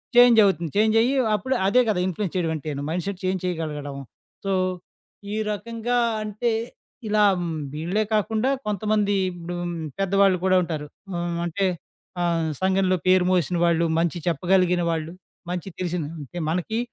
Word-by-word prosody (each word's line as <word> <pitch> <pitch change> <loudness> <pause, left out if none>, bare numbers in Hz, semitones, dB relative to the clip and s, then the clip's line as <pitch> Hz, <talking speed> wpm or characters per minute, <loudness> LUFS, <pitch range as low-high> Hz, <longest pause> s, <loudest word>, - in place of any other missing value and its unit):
చేంజవుతుంది. 220 -8 +6
చేంజయ్యి 225 +4 +4 0.2
అప్పుడు 260 +5 -1
అదే 250 +6 +5
గదా 200 -4 +1
ఇన్‌ఫ్లుయెన్స్ 190 0 -3
చేయడం 170 -3 0
అంటేను, 150 -2 -4
మైండ్‌సెట్ 180 +3 -3
చేంజ్ 185 0 0
చేయగలగడం. 150 -5 -3 0.5
సో 195 - 0 0.8
ఈ - - -1
రకంగా 230 +3 -2 0.3
అంటే 215 +3 -1 0.6
ఇలా 210 0 +3 0.2
హ్మ్, 170 -2 -3 0.2
వీళ్ళే 175 +8 0
కాకుండా 215 +3 +1 0.2
కొంతమంది 210 0 +1 0.2
ఇప్పుడు 175 0 -6 0.4
పెద్దవాళ్ళు 195 -1 +3
కూడా 185 0 +4
ఉంటారు. 155 -3 -4 0.3
ఆహ్, 170 0 -2
అంటే 185 +4 -1 0.6
ఆహ్, 165 -2 +1
సంఘంలో 190 0 +2
పేరు 185 0 +5
మోసిన 180 -1 +1
వాళ్ళు. 170 0 +3
మంచి 170 0 0
చెప్పగలిగిన 180 +2 +2
వాళ్ళు. 160 -1 -2 0.4
మంచి 180 +1 -3
తెలిసిన 180 -2 -2 0.2
అంటే 145 +4 -9
మనకి 180 +7 -1
185 Hz, 135 wpm, -24 LUFS, 170-210 Hz, 0.8 s, చేంజవుతుంది